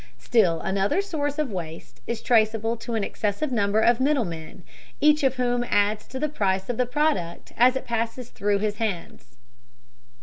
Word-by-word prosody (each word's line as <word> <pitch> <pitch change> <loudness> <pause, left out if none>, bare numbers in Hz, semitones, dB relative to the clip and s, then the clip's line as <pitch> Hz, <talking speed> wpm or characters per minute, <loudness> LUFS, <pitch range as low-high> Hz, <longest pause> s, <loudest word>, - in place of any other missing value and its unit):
Still 185 -9 +2
another 195 - 0
source 300 -7 -2
of 300 -6 -1
waste 165 -4 -7
is 235 - -3
traceable 225 -1 +2
to 230 0 -5
an 215 - 0
excessive 210 +9 -2
number 210 -2 +2
of 240 +1 +4
middlemen, 225 - -1 0.4
each 300 0 +4
of 265 -2 +2
whom 245 -1 0
adds 205 +1 +1
to 265 - -7
the 305 +3 0
price 190 -9 -1
of 235 - -6
the 250 - +1
product 250 - -1
as 250 +2 +5
it 265 - -3
passes 230 +1 -3
through 205 0 0
his 210 0 -2
hands. 185 - -5
225 Hz, 170 wpm, -25 LUFS, 200-255 Hz, 0.4 s, as